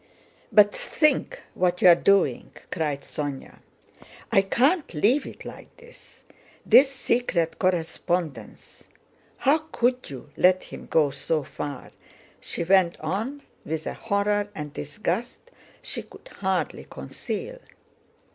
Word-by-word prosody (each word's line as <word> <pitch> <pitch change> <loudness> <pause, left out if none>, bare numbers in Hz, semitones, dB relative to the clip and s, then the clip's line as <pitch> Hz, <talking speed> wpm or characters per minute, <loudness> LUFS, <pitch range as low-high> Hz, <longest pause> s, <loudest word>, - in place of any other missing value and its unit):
"But 205 -1 +6
think 310 +10 +1
what 180 -1 +1
you - - +6
are 175 - +10
doing," 195 +3 +2 0.2
cried 150 -5 -1
Sónya. 145 -2 -6 0.7
"I 195 - +6
can't 275 - +1
leave 240 - +2
it - - -10
like - - -11
this. 485 0 -17 0.4
This 270 +1 +7
secret 235 -10 0
correspondence... 175 -3 -2 0.5
How 285 +4 +3
could 250 +1 0
you 140 +1 -10
let 185 0 +4
him - - -10
go 150 -3 +3
so 155 +2 -1
far?" 140 0 -7 0.5
she - - -4
went 180 -1 +3
on, 220 - -3 0.2
with 160 0 -4
a - - -3
horror 205 -1 0
and 150 -3 -6
disgust 215 - -4 0.3
she - - -4
could - - -15
hardly 190 -2 -2
conceal. - - -6
190 Hz, 120 wpm, -25 LUFS, 160-245 Hz, 0.7 s, are